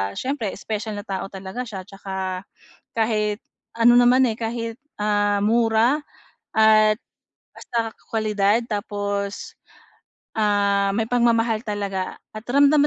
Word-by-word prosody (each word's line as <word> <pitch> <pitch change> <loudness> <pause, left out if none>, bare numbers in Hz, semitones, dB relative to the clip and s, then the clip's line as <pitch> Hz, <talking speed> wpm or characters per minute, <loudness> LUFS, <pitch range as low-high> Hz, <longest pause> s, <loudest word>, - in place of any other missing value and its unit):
siyempre 255 -6 -2
special 215 +1 -4
na 205 - -5
tao 195 0 -3
talaga 190 +5 -5
siya 200 -4 -6
tsaka, 190 -1 -5 0.5
kahit 215 -2 +1 0.4
ano 235 +1 +6
naman, 250 +2 +5
eh, 220 - -2
kahit, 230 0 -3 0.2
ah, 205 -1 +2
mura 230 +5 +3 0.6
at 215 -1 +6 0.6
basta 230 -2 -3 0.2
kwalidad 215 0 +1
tapos, 205 -1 -3 0.8
ah, 200 -2 +2
may 225 0 +1
pagmamahal 230 -2 +2
talaga. 200 -3 -3 0.2
At 215 - -9
ramdam 285 +2 +5
215 Hz, 110 wpm, -23 LUFS, 205-230 Hz, 0.8 s, ano